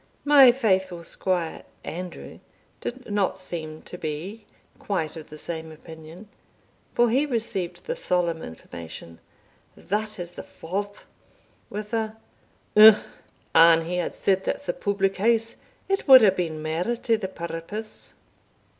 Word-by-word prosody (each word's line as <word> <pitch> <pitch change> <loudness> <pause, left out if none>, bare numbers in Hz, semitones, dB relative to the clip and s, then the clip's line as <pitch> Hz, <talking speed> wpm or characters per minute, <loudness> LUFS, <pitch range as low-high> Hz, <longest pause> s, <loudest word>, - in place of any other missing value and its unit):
My 280 -4 +8
faithful 190 -8 0
squire, 175 -1 -2 0.2
Andrew, 180 +1 -7 0.4
did 250 -2 -6
not 200 -2 +1
seem 160 -4 -6
to 180 - -9
be 185 +8 -6 0.3
quite 170 -6 -2
of 160 -1 -10
the 155 - -10
same 160 0 -6
opinion, 160 +4 -12 0.7
for 240 -1 +4
he 275 +5 +2
received 220 -8 -3
the - - -3
solemn 175 - 0
information, 85 0 -10 0.6
"That 215 +2 -2
is 175 -1 -6
the - - -8
Forth," 200 +4 -6 0.6
with 210 +2 -6
a 220 -1 -2 0.6
"Umph! 215 0 +9 0.5
an 165 0 +6
he 180 +2 -2
had 175 - -2
said 190 -1 +1
that's 190 - -3
the 175 - -1
public 195 -1 -1
house, 225 +2 +1 0.3
it 390 -3 -1
wad 260 -2 +10
hae 200 - +7
been 165 -4 -3
mair 160 +2 -1
to 235 +1 0
the 190 - -3
purpose." 180 +5 -7
190 Hz, 135 wpm, -25 LUFS, 165-220 Hz, 0.7 s, wad